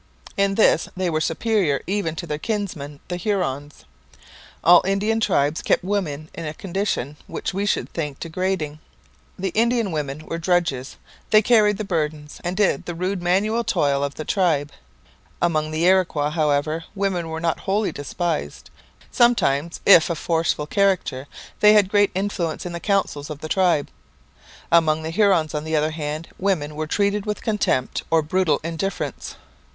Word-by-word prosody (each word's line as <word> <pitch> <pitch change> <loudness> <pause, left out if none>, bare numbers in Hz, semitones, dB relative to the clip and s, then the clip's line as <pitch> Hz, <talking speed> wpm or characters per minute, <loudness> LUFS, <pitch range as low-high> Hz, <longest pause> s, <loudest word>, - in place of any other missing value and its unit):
In 200 0 +1
this 195 -6 +3
they 185 -2 0
were 155 0 0
superior 170 -3 0
even 185 -4 -1
to 170 - -5
their 150 -2 -4
kinsmen 165 -9 -4
the 180 - -3
Hurons. 160 -8 -3 0.8
All 175 +2 +7
Indian 200 +4 0
tribes 150 -7 +1
kept - - +1
women 170 -7 -2
in 170 - -7
a 155 -1 -5
condition 175 -7 -3
which - - -4
we 200 +2 -1
should - - 0
think 150 -4 -5
degrading. 165 -3 -2 0.6
The 190 +1 -2
Indian 230 0 +1
women 150 -1 -4
were 165 - -4
drudges; 170 -7 0 0.3
they 215 0 +5
carried 210 -3 +4
the 215 - -3
burdens, 155 -5 -3
and 180 +1 -3
did 210 -2 +1
the 175 - -4
rude 185 +2 -2
manual 205 +6 +1
toil 140 -8 +1
of 140 0 -3
the 155 - -6
tribe. 160 -7 +1 0.7
Among 155 -3 +1
the 155 +2 0
Iroquois, 175 -6 +2
however, 155 +1 0
women 190 -4 -1
were 160 0 -4
not 165 -1 -1
wholly 205 +2 0
despised; 150 - -4 0.4
sometimes, 170 - +2
if 170 -7 +7
of 170 - -2
forceful 165 -3 0
character, 185 -7 0 0.3
they 210 0 +7
had 205 -3 +4
great 205 -1 +4
influence 185 -5 -2
in 180 - -4
the 170 - -5
councils 180 -7 -1
of 150 -1 -7
the 155 - -5
tribe. 175 -4 +2 0.8
Among 160 -2 +3
the 160 - -4
Hurons, 180 -5 +2
on 150 0 -2
the 160 0 -2
other 155 +1 +1
hand, 155 +1 -4
women 160 -6 -1
were 155 0 -3
treated 200 +4 0
with 210 - -3
contempt 210 - 0
or 160 -1 +3
brutal 160 -1 +1
indifference. 165 +4 -4
170 Hz, 165 wpm, -22 LUFS, 150-195 Hz, 0.8 s, All